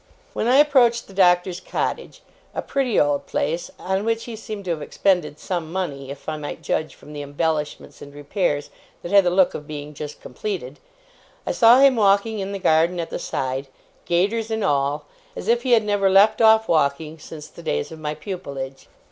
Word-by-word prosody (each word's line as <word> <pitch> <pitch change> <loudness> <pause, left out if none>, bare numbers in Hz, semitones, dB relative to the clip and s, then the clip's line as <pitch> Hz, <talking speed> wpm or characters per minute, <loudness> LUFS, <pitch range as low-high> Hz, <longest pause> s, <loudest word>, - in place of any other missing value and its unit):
When 225 - -1
I 250 - +4
approached 260 -5 +4
the 195 - -15
Doctor's 180 -1 +3
cottage - - -4 0.3
a - - -2
pretty 265 -6 0
old 145 -1 +1
place, 165 +2 -2
on 190 +2 -2
which 225 0 -1
he 235 - -7
seemed 215 -2 -7
to 180 - -1
have 160 -2 -3
expended 175 -1 0
some 165 -2 -4
money, 145 -8 -4
if 140 0 -9
I 155 -1 -2
might 145 -1 -7
judge 155 - -2
from 150 - -14
the 145 - -5
embellishments 150 +1 -3
and 145 - -10
repairs 145 +1 -2 0.3
that 175 - -6
had 200 -2 +6
the - - +4
look 185 +1 +3
of 150 - -7
being 150 -1 -7
just 150 0 -7
completed 145 -1 -6 0.7
I - - -1
saw 235 +1 +6
him 275 -3 +6
walking 205 +1 +3
in 195 0 -4
the 200 - -3
garden 170 0 +2
at 165 - -4
the - - -3
side, 135 +1 -3 0.4
gaiters 205 +6 0
and 220 -1 -2
all, 145 -4 0 0.3
as - - -7
if 235 +1 +3
he 255 -1 +2
had 225 -2 +5
never 205 -2 +2
left 200 +4 +5
off 220 0 +6
walking 155 0 0
since 150 0 -10
the - - -13
days 75 - -2
of 160 - -9
my 150 0 -3
pupilage. 140 -9 -7
175 Hz, 200 wpm, -22 LUFS, 150-210 Hz, 0.7 s, had